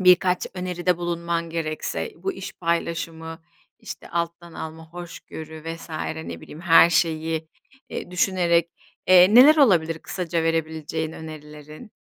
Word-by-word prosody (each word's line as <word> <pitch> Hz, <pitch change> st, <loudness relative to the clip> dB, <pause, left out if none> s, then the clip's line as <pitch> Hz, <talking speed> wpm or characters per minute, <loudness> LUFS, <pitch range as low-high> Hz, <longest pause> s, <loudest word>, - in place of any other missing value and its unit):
birkaç 180 Hz, 0 st, +4 dB
öneride 180 Hz, -1 st, -1 dB
bulunman 170 Hz, -1 st, -2 dB
gerekse 165 Hz, -, -3 dB
bu, 390 Hz, -, -3 dB
iş -, -, -7 dB
paylaşımı, 165 Hz, -1 st, -3 dB, 0.4 s
işte, -, -, -9 dB
alttan 170 Hz, 0 st, -3 dB
alma, 160 Hz, 0 st, -7 dB
hoşgörü 160 Hz, -2 st, -9 dB
vs. 165 Hz, 0 st, -7 dB, 0.4 s
ne -, -, -7 dB
bileyim 155 Hz, -, -11 dB
her 170 Hz, -1 st, +6 dB
şeyi, 160 Hz, -1 st, 0 dB, 0.4 s
eee, -, -, -6 dB
düşünerek, 175 Hz, -2 st, +2 dB, 0.4 s
eee, 185 Hz, +3 st, +7 dB
neler 290 Hz, +6 st, +9 dB
olabilir 165 Hz, -, +4 dB
kısaca 170 Hz, -2 st, -3 dB
verebileceğin 160 Hz, -1 st, -2 dB
önerilerin? 155 Hz, +4 st, -10 dB
170 Hz, 120 wpm, -24 LUFS, 160-180 Hz, 0.4 s, neler